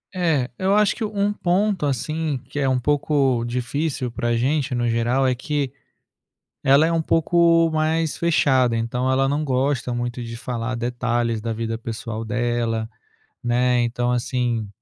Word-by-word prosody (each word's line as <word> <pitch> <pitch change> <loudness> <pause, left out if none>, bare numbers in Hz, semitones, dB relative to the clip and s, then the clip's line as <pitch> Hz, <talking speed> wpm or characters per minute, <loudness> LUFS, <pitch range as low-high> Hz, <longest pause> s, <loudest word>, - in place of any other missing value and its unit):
É. 160 -8 +1
Eu 190 +1 +2
acho 210 -1 +3
que 225 - -4
um 205 -1 0
ponto, 190 -1 0
assim, 155 +3 -2
que 145 - -5
é 135 - +1
um 130 -1 +2
pouco 140 -3 +1
difícil 125 +2 -2
para 120 - -3
a 120 - +1
gente 135 +1 0
no 120 0 0
geral, 120 +3 +1
é 130 - +3
que 135 +1 -2 0.9
ela 140 +4 +5
é - - 0
um 165 -1 +1
pouco 165 0 +3
mais 160 0 0
fechada, 130 -7 +2
então 125 +3 -1
ela 135 +1 +2
não 145 +2 0
gosta 130 -2 0
muito 120 0 -3
de 115 0 -6
falar 120 0 -4
detalhes 120 -1 -1
da 115 +1 -3
vida 115 0 -3
pessoal 115 -1 -5
dela, 115 -1 -1 0.5
né, 125 +1 +2
então, 120 +1 0
assim 120 -3 -1
125 Hz, 160 wpm, -22 LUFS, 120-150 Hz, 0.9 s, ela